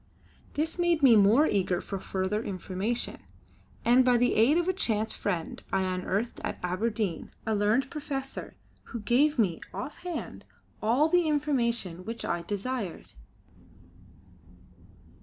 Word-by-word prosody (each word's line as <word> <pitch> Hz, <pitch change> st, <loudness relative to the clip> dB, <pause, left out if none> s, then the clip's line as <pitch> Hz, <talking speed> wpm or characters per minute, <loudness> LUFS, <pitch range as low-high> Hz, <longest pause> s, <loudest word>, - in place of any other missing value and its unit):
This 320 Hz, +4 st, -1 dB
made 345 Hz, -3 st, +2 dB
me 250 Hz, -4 st, +8 dB
more 215 Hz, +8 st, +6 dB
eager 185 Hz, -, +1 dB
for 195 Hz, 0 st, -5 dB
further 190 Hz, +3 st, -2 dB
information, 200 Hz, +3 st, -3 dB, 0.7 s
and 245 Hz, +2 st, +6 dB
by 250 Hz, -1 st, +4 dB
the 245 Hz, +1 st, +3 dB
aid 245 Hz, +9 st, +4 dB
of 345 Hz, 0 st, +1 dB
a 375 Hz, -, +2 dB
chance 220 Hz, -, 0 dB
friend, 175 Hz, -5 st, -3 dB
I 190 Hz, 0 st, +2 dB
unearthed 185 Hz, +4 st, -2 dB
at -, -, -3 dB
Aberdeen 195 Hz, 0 st, -1 dB, 0.2 s
a 220 Hz, -, 0 dB
learned 215 Hz, +6 st, +2 dB
professor 275 Hz, -3 st, -5 dB, 0.3 s
who 235 Hz, -, -6 dB
gave 275 Hz, +8 st, +3 dB
me 190 Hz, -8 st, +1 dB
offhand 320 Hz, +5 st, -6 dB, 0.4 s
all 245 Hz, +8 st, +3 dB
the 350 Hz, 0 st, +3 dB
information 235 Hz, -, 0 dB
which 230 Hz, +3 st, -5 dB
I 170 Hz, 0 st, -1 dB
desired. 205 Hz, +1 st, -4 dB
230 Hz, 130 wpm, -28 LUFS, 195-275 Hz, 0.7 s, me